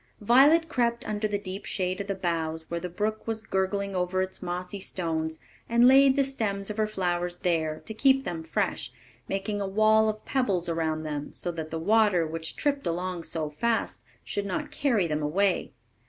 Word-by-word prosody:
Violet 280 +9 +5
crept 235 -4 0
under 215 0 -1
the 205 -1 -1
deep 195 0 -6
shade 185 0 -2
of 200 - -6
the 195 - -1
boughs, 160 -3 -2
where 170 - -1
the 180 +1 -5
brook 215 +6 -3
was 225 -1 -1
gurgling 195 -1 -1
over 180 +1 0
its 185 0 -3
mossy 180 +2 -4
stones, 160 -4 -2 0.3
and 235 +1 +5
laid 270 0 +7
the 280 - +3
stems 210 -7 -1
of 210 - -7
her 215 -1 +2
flowers 175 -3 -2
there 160 -3 -1
to 220 - -6
keep 270 +4 +3
them 170 -8 -4
fresh, 165 - -2 0.4
making 200 +1 -2
a 200 - -1
wall 215 +2 +4
of 215 0 -5
pebbles 200 -10 +1
around 160 -2 -1
them, 150 -2 -4
so 175 - -1
that 160 -2 -6
the 165 - -3
water, 205 -1 +3
which 160 +1 -4
tripped 285 -5 -1
along 175 0 -2
so 155 -3 -2
fast, 230 +9 -1 0.2
should 200 0 -3
not 185 - -3
carry 240 -10 +1
them 155 -2 -1
away. 185 +6 +1
190 Hz, 190 wpm, -27 LUFS, 170-220 Hz, 0.4 s, laid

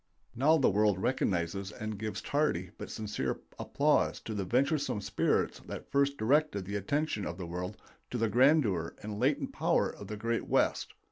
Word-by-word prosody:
Now 150 +6 +4
the 135 - +3
world 105 -1 +3
recognizes 95 -4 -1
and 110 0 -5
gives 105 -2 -4
tardy 115 - 0
but - - -6
sincere 105 - -3 0.2
applause - - +2
to 110 - -5
the 100 -2 -2
venturesome 140 - +1
spirits 100 - 0
that - - -8
first 140 0 +2
directed 130 -3 +2
the 100 +2 -4
attention 110 - -1
of 85 - -4
the 90 - -5
world 90 +4 -5 0.3
to 125 - -3
the 115 -1 +2
grandeur 120 - +3
and 105 0 -5
latent - - +1
power - - +1
of 100 - -10
the 105 +1 -5
great 115 +2 -1
West. - - +1
105 Hz, 175 wpm, -31 LUFS, 95-135 Hz, 0.3 s, Now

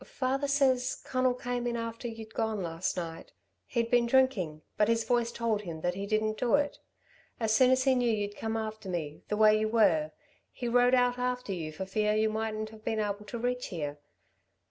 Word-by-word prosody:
"Father 270 +2 -1
says, 265 -2 +2
Conal 255 -1 0
came 245 -1 -3
in 235 -1 -1
after 230 +1 -4
you'd 225 -1 -8
gone 220 -3 -1
last 165 +2 -2
night. 165 -2 -6 0.3
He'd 230 -1 -1
been 240 -1 +4
drinking, 215 - +2
but 210 - +3
his 230 0 +2
voice 240 -1 +1
told 230 -3 -1
him 165 -5 -7
that 175 +1 0
he 195 +2 -5
didn't 215 +1 0
do 250 +1 +3
it. 290 0 0 0.6
As 220 -2 +1
soon 250 +3 +5
as 260 0 +3
he 265 -1 +4
knew 245 -2 +2
you'd 205 -2 -1
come 225 +1 -2
after 220 -2 -5
me, 155 -4 -4
the 210 - -1
way 215 0 +6
you 215 - +1
were, 190 -9 +3 0.4
he 245 - -5
rode 245 +1 +4
out 245 0 +2
after 250 -4 -2
you 160 -4 -4
for 175 +5 -5
fear 210 +2 +1
you 215 0 +2
mightn't 215 0 -3
have 220 -1 -14
been 220 - -1
able 210 0 -2
to 235 - -5
reach 250 +1 -2
here. 145 -4 -5
220 Hz, 210 wpm, -30 LUFS, 205-245 Hz, 0.6 s, way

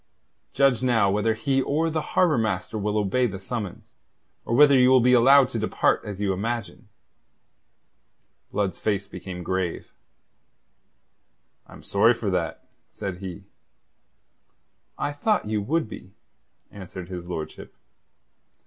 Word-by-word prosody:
Judge 135 -4 +2
now 115 -6 +2
whether 105 +2 +1
he 135 +4 0
or 150 +5 0
the 155 0 -1
Harbour 170 -2 +2
Master 110 0 -2
will 105 0 -1
obey 105 +5 +1
the 100 -3 -6
summons, 100 0 -6 0.5
or 115 - -1
whether 145 +1 +7
you 125 -1 +5
will 130 0 +6
be 125 +1 +4
allowed 135 +2 +6
to 115 - -3
depart 110 - +1
as 100 -2 -7
you 100 -2 0
imagine." 105 -2 -4 1.6
Blood's 100 -3 -2
face 100 -2 -1
became 90 -3 -8
grave. 95 -1 -3 1.7
"I'm - - -14
sorry - - +3
for - - -3
that," - - -3 0.2
said 95 -4 -6
he. 95 -3 -7 1.5
I 145 - -2
thought 205 - 0
you 105 0 -1
would 155 +6 -1
be, 95 -3 -11 0.6
answered 95 -2 -9
his 90 -2 -7
lordship. 80 -3 -7
110 Hz, 130 wpm, -25 LUFS, 95-130 Hz, 1.7 s, whether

